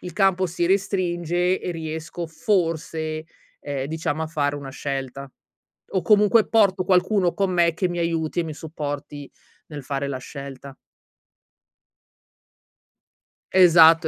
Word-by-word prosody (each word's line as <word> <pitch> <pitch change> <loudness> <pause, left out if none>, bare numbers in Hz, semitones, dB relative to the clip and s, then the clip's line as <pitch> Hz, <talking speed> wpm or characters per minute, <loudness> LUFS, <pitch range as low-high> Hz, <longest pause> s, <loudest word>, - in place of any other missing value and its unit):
il 180 -2 -7
campo 190 0 +2
si 175 0 -2
restringe 180 -2 0
e 180 - -3
riesco, 160 +1 -5
forse, 160 -5 -1 0.4
ehm, 140 -2 -4
diciamo, 160 0 -2
a - - -2
fare 145 -2 -1
una 140 -2 -7
scelta 135 -1 -5 0.7
o 190 - +3
comunque 210 +4 +4
porto 195 -4 +3
qualcuno 185 0 +2
con 195 -1 0
me 170 -2 +3
che 185 - 0
mi 175 -1 -3
aiuti 165 0 -1
e 170 - -2
mi 155 -2 -6
supporti 145 -2 -6 0.4
nel 145 -3 -8
fare 140 -1 -2
la 135 - -3
scelta. 140 0 -9 2.8
Esatto. 165 -3 +7
165 Hz, 130 wpm, -23 LUFS, 145-180 Hz, 2.8 s, Esatto